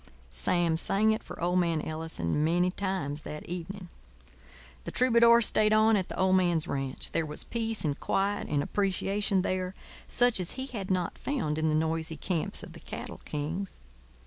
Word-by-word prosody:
Sam 160 - +1
sang 210 +6 +3
it 220 - -1
for - - -10
old 180 +2 +2
man 170 -3 +1
Ellison 155 - -2
many 175 +3 +2
times 180 -7 -2
that 150 0 -7
evening. 180 +2 -6 1.0
The - - -5
troubadour 235 -2 +5
stayed 215 0 +3
on 215 +1 +5
at 190 -3 -1
the - - -6
old 190 0 +4
man's 175 -3 +1
ranch. 135 -3 -2
There 165 - 0
was 150 -1 -5
peace 225 -4 -3
and 145 -2 -1
quiet 200 +1 0
and 145 -1 0
appreciation 195 0 0
there, 185 0 -2 0.3
such 245 -4 +4
as 180 - 0
he 260 0 -4
had 215 -8 -6
not 180 -2 -1
found 160 - -1
in 160 0 +1
the 155 - +2
noisy 160 0 -1
camps 170 -5 -1
of - - -10
the - - -11
cattle - - -8
kings. 160 +7 -4
180 Hz, 175 wpm, -29 LUFS, 160-205 Hz, 1.0 s, troubadour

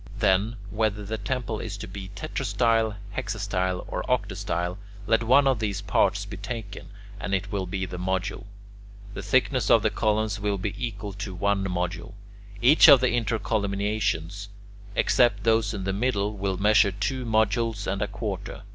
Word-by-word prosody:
Then, 100 +5 +2 0.2
whether 105 -1 -1
the 110 +2 -4
temple 115 +1 -3
is 105 -3 -5
to - - -7
be 95 0 -8
tetrastyle, 115 +2 0 0.2
hexastyle, 100 -6 -2
or - - -3
octastyle, 90 +2 -1 0.3
let 115 +2 +3
one 130 +5 +5
of 135 -4 +2
these 100 -3 -2
parts 100 - +1
be - - -8
taken, 110 -4 -6 0.3
and 100 - -1
it 100 +2 -3
will 95 -3 -2
be 95 +1 -2
the 90 -1 -7
module. 95 +1 -2 0.7
The - - -5
thickness - - +1
of - - +6
the - - +2
columns 110 -1 0
will 100 0 -1
be 100 +2 -3
equal 105 -5 -5
to 100 -1 -6
one 100 +1 0
module. 90 +1 -3 0.5
Each 150 +6 +8
of 140 -3 +10
the 130 0 +2
intercolumniations, 100 -4 -1 0.5
except 120 -5 +3
those 110 -2 +2
in 100 -3 -4
the 95 0 -1
middle, 105 -1 0
will 95 -1 -2
measure 105 +1 +4
two 125 +7 -2
modules 110 -1 +1
and 100 +2 -2
a 105 - 0
quarter. - - -5
105 Hz, 165 wpm, -26 LUFS, 95-110 Hz, 0.7 s, of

